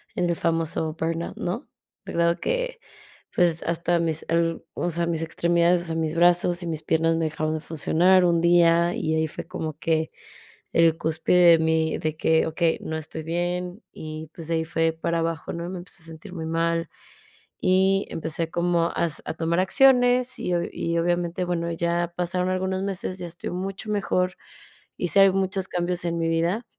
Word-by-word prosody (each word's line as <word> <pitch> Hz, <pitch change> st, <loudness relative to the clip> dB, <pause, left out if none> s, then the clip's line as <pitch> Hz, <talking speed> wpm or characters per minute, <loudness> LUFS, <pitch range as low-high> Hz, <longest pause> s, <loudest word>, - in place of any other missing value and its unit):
en 175 Hz, -1 st, 0 dB
el 170 Hz, -, +1 dB
famoso 165 Hz, -1 st, -1 dB
burnout, 165 Hz, +1 st, -2 dB
¿no? 205 Hz, +11 st, -4 dB, 0.4 s
La -, -, -7 dB
verdad 170 Hz, +1 st, +2 dB
que, -, -, -2 dB, 0.6 s
pues, 170 Hz, -2 st, +2 dB
hasta 170 Hz, +1 st, 0 dB
mis 160 Hz, -2 st, -2 dB
ar 165 Hz, 0 st, +1 dB
o 175 Hz, -, -2 dB
sea, 170 Hz, +1 st, 0 dB
mis 165 Hz, -1 st, -1 dB
extremidades, 170 Hz, +2 st, +2 dB
o -, -, -6 dB
sea, 165 Hz, -1 st, -3 dB
mis 160 Hz, -1 st, -1 dB
brazos 175 Hz, +1 st, +3 dB
y -, -, -4 dB
mis 160 Hz, -2 st, -4 dB
piernas 165 Hz, +1 st, +2 dB
me 165 Hz, -, 0 dB
dejaron 155 Hz, 0 st, -2 dB
de -, -, -3 dB
funcionar 175 Hz, +4 st, +3 dB
un 170 Hz, -1 st, +3 dB
día. 170 Hz, 0 st, +4 dB
Y 160 Hz, 0 st, -1 dB
ahí 160 Hz, 0 st, +1 dB
fue -, -, -8 dB
como 155 Hz, -1 st, -4 dB
que 160 Hz, -1 st, 0 dB, 0.6 s
el 165 Hz, -1 st, +4 dB
cúspide 165 Hz, +2 st, +4 dB
de 165 Hz, -, +6 dB
mí 160 Hz, 0 st, +1 dB
de 155 Hz, 0 st, -2 dB
que: 160 Hz, 0 st, +3 dB
"Okey, 160 Hz, +1 st, 0 dB
no 160 Hz, -, -4 dB
estoy 160 Hz, +1 st, -6 dB
bien", 175 Hz, +4 st, -2 dB
y, 155 Hz, 0 st, -7 dB
pues, 165 Hz, -2 st, -9 dB
de 165 Hz, -, +1 dB
ahí 160 Hz, 0 st, 0 dB
fue 165 Hz, 0 st, +1 dB
para 165 Hz, +1 st, -1 dB
abajo, 165 Hz, -2 st, -2 dB
¿no? 170 Hz, 0 st, -4 dB
Me 185 Hz, -1 st, -5 dB
empecé 175 Hz, -1 st, -10 dB
a -, -, -9 dB
sentir 160 Hz, +2 st, -11 dB
muy 160 Hz, -3 st, -5 dB
mal, 165 Hz, 0 st, 0 dB, 0.7 s
y 190 Hz, +1 st, +3 dB
empecé 160 Hz, 0 st, -3 dB
como 170 Hz, -1 st, +1 dB
a -, -, -4 dB
hace 165 Hz, -3 st, -1 dB
a -, -, -3 dB
tomar 165 Hz, +2 st, 0 dB
acciones, 250 Hz, +3 st, +4 dB
y 180 Hz, -, -2 dB
obvia 170 Hz, -, -1 dB
y 170 Hz, 0 st, -2 dB
obviamente 175 Hz, +1 st, 0 dB
bueno, 170 Hz, -1 st, -2 dB
ya 170 Hz, +1 st, -1 dB
pasaron 180 Hz, +1 st, 0 dB
algunos 185 Hz, 0 st, -1 dB
meses, 190 Hz, -1 st, -3 dB
ya 175 Hz, -, -5 dB
estoy 170 Hz, +1 st, -6 dB
mucho 190 Hz, +3 st, -5 dB
mejor, 185 Hz, -3 st, 0 dB, 0.6 s
hice 180 Hz, +2 st, +2 dB
al 195 Hz, -1 st, +6 dB
muchos 190 Hz, 0 st, -1 dB
cambios 175 Hz, 0 st, -1 dB
en 170 Hz, 0 st, -1 dB
mi 165 Hz, -, 0 dB
vida, 170 Hz, +8 st, 0 dB
170 Hz, 195 wpm, -25 LUFS, 165-180 Hz, 0.7 s, de